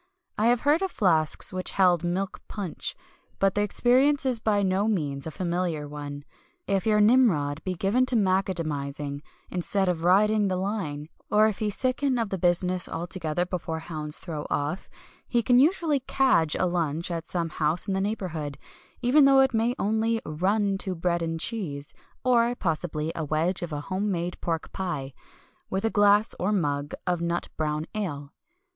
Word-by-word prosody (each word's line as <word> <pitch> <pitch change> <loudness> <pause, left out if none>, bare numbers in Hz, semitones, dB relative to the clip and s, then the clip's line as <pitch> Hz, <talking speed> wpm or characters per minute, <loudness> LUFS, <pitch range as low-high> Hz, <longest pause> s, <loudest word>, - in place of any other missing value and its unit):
I 215 - +2
have 240 0 +3
heard 295 +4 +3
of 385 - 0
flasks 165 - +1
which 185 0 -2
held 180 -3 +3
milk 185 +3 -2
punch, 195 -6 -4 0.4
but 195 -1 +2
the 205 - +1
experience 260 +7 +3
is 250 -3 0
by 210 -2 +1
no 190 +2 +1
means 145 -9 -1
a - - -2
familiar 170 -3 -2
one. 145 -1 -7 0.4
If 195 +1 0
your 210 -1 +4
Nimrod 205 - +3
be 185 -1 -2
given 210 +9 +1
to 255 - +2
"macadamising," 155 -8 -1 0.3
instead 190 +2 0
of 170 -2 -1
riding 205 +3 +4
the 185 - 0
line, 180 -7 -3 0.2
or 210 +1 +5
if 215 -3 0
he 215 - 0
sicken 255 +4 0
of 230 -3 -1
the 190 - -3
business 180 +1 +2
altogether 175 -1 -2
before 175 -3 -4
hounds 155 -2 -4
throw 160 -5 -5
off, 145 +6 -2 0.4
he 240 -2 +1
can 245 +2 +5
usually 310 -1 +3
"cadge" 255 - +2
a - - +1
lunch 170 -1 -1
at 165 -1 -4
some 170 -2 -1
house 155 +4 0
in 195 - 0
the 190 - 0
neighbourhood, 170 -9 -3 0.5
even 275 +4 +5
though 270 -1 +6
it 265 -1 +2
may 230 +2 +1
only 220 +2 +1
"run 195 +5 0
to" 190 -2 -2
bread 170 0 0
and 165 0 -2
cheese 160 -9 -3 0.3
or, 240 -1 +3
possibly, 160 -4 -2
a 165 - -4
wedge 155 +5 0
of 175 -2 -4
a 145 -1 -3
home 190 +6 -2
made 175 0 -3
pork 165 -2 -3
pie 150 -8 -4 0.6
with 190 +3 -2
a 225 - +1
glass, 205 +1 +4
or 190 +4 0
mug, 145 -7 -1
of 175 -2 0
nut 170 0 -2
brown 155 0 -2
ale. 145 -9 -4
185 Hz, 175 wpm, -26 LUFS, 160-215 Hz, 0.6 s, though